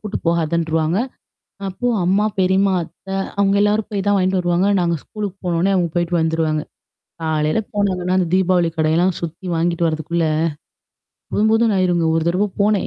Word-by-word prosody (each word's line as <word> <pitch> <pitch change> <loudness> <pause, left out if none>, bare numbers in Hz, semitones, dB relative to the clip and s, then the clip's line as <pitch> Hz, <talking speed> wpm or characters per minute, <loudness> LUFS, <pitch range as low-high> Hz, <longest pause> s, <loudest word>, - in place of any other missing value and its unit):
கூட்டு 210 -1 -4
போகாதுன்ருவாங்க. 165 +1 +1 0.7
அப்போ 220 +6 -3 0.2
அம்மா, 195 +4 +2
பெரிம்மா, 190 +1 +3
அத்தை 190 +3 -9 0.2
அவங்க 200 0 +3
எல்லாரும் 210 +1 +1
போய் 200 -2 -2
தான் 205 - +4
வாங்கிட்டு 185 0 +1
வருவாங்க. 175 +2 +1
நாங்க 170 -1 +1
ஸ்கூலுக்கு 205 -3 -6
போன 175 - 0
உடனே 195 +3 +2
அவங்க 175 -3 +1
போயிட்டு 175 0 0
வந்துருவாங்க. 160 -1 0 0.6
காலையில 155 +3 0
போனாங்கன்னா 185 -3 0
அந்த 180 - +1
தீபாவளி 185 -2 +3
கடையெல்லாம் 165 +4 +2
சுத்தி 170 +2 -6
வாங்கிட்டு 170 +1 0
வரதுக்குள்ள, 160 +1 -1 1.1
போதும் 215 +1 +2
போதும்ன்னு 225 -2 +3
ஆயிருங்க 175 -2 +2
ஒரு 165 - +1
தடவை 185 +4 +1
போனேன். 205 -1 +2
180 Hz, 155 wpm, -19 LUFS, 165-195 Hz, 1.1 s, தான்